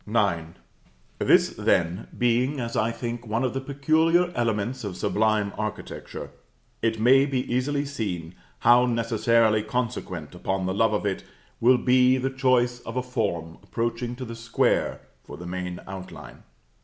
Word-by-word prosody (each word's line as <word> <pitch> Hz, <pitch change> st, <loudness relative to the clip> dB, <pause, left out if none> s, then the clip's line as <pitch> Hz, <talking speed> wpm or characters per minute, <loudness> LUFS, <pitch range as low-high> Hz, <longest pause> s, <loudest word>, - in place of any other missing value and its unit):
IX. 95 Hz, -7 st, 0 dB, 0.6 s
This, -, -, +4 dB
then, 85 Hz, +3 st, 0 dB
being, 125 Hz, +4 st, +1 dB
as 115 Hz, -1 st, -4 dB
I 110 Hz, -, +2 dB
think, 120 Hz, 0 st, -5 dB
one 115 Hz, +4 st, 0 dB
of 125 Hz, -, 0 dB
the 135 Hz, -, -2 dB
peculiar 160 Hz, +6 st, +2 dB
elements 115 Hz, -, -1 dB
of 95 Hz, -4 st, -5 dB
sublime 105 Hz, -1 st, +1 dB
architecture, 110 Hz, -1 st, -6 dB, 0.5 s
it 110 Hz, -1 st, 0 dB
may 135 Hz, +5 st, +5 dB
be 135 Hz, -3 st, 0 dB
easily 140 Hz, +3 st, 0 dB
seen 95 Hz, -12 st, -4 dB, 0.3 s
how 120 Hz, +1 st, +6 dB
necessarily 115 Hz, -2 st, +2 dB
consequent 105 Hz, -, -3 dB
upon 95 Hz, +1 st, -2 dB
the 95 Hz, -, -1 dB
love 110 Hz, +2 st, +2 dB
of 105 Hz, -, -1 dB
it 95 Hz, -2 st, -2 dB, 0.4 s
will 125 Hz, +2 st, +5 dB
be 125 Hz, +1 st, +4 dB
the 130 Hz, +1 st, -1 dB
choice 125 Hz, -2 st, +2 dB
of 115 Hz, +1 st, -7 dB
a 125 Hz, -, 0 dB
form 85 Hz, -10 st, -3 dB
approaching 120 Hz, +1 st, -3 dB
to 130 Hz, +1 st, -6 dB
the 115 Hz, -1 st, -7 dB
square 115 Hz, 0 st, 0 dB, 0.2 s
for 75 Hz, -, -10 dB
the 90 Hz, -, -9 dB
main 90 Hz, 0 st, -4 dB
outline. 95 Hz, -1 st, -9 dB
115 Hz, 155 wpm, -25 LUFS, 100-125 Hz, 0.6 s, how